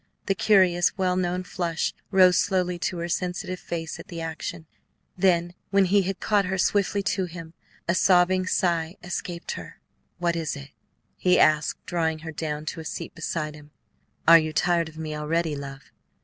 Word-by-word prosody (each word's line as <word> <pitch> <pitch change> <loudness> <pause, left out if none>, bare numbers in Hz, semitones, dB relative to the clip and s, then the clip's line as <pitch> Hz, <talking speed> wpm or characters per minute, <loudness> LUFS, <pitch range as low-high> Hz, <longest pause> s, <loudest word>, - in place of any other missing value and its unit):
The 195 - +2
curious, 185 -3 +3
well 185 -1 +1
known 180 0 -1
flush 175 -3 -2 0.2
rose 185 -2 +6
slowly 180 -2 0
to 180 - -6
her 170 0 -3
sensitive 180 0 -3
face 165 -1 -5
at - - -10
the 170 - -7
action; 160 0 -5 0.5
when 180 +1 +2
he 200 +2 +4
had 190 0 -3
caught 205 -2 +2
her 190 +1 -1
swiftly 200 +1 +1
to 190 0 0
him, 165 -2 -9 0.3
a 170 - +3
sobbing 185 0 +4
sigh 170 -2 0
escaped 175 -1 -4
her. - - -8 0.4
"What 170 -1 0
is 165 -3 -2
it?" 140 0 -10 0.5
he 180 -1 +3
asked, 155 0 +2
drawing 160 -2 0
her 160 - -4
down 150 -1 -4
to 170 - -9
a - - -6
seat - - -6
beside 155 -2 -3
him. 150 -1 -14 0.6
"Are 165 0 +10
you 155 -1 -3
tired 170 0 +2
of 160 - -15
me 155 -1 -4
already, 155 +1 -1
love?" 135 -1 -9
175 Hz, 175 wpm, -25 LUFS, 160-185 Hz, 0.6 s, Are